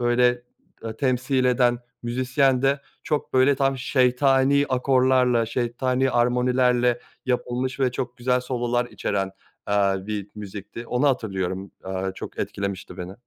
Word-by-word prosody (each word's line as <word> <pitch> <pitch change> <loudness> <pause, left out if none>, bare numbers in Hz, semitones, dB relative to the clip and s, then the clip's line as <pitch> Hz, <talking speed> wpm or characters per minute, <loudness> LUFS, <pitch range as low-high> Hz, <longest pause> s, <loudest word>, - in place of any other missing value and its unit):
böyle 120 0 +2 0.4
e 110 -1 -5
temsil 130 +1 +1
eden 125 -1 +3 0.2
müzisyen 125 +2 +1
de 140 +1 +2 0.2
çok 150 -2 -2
böyle 130 +2 +5
tam 135 0 0
şeytani 135 +2 +3
akorlarla, 130 -2 +3
şeytani 125 +3 0
armonilerle 125 0 +2 0.3
yapılmış 125 +1 -1
ve 125 -2 +2
çok 125 -1 -4
güzel 125 +1 +1
sololar 120 -1 -1
içeren, 95 -4 -2 0.3
aaa, 100 -1 +1
bir 105 -2 -4
müzikti. 105 +3 -8
Onu 125 +4 +2
hatırlıyorum, 95 -6 -2
aaa, 95 0 -3
çok - - -8
etkilemişti 100 -2 -4
beni. 90 +1 -6
125 Hz, 125 wpm, -24 LUFS, 115-130 Hz, 0.4 s, böyle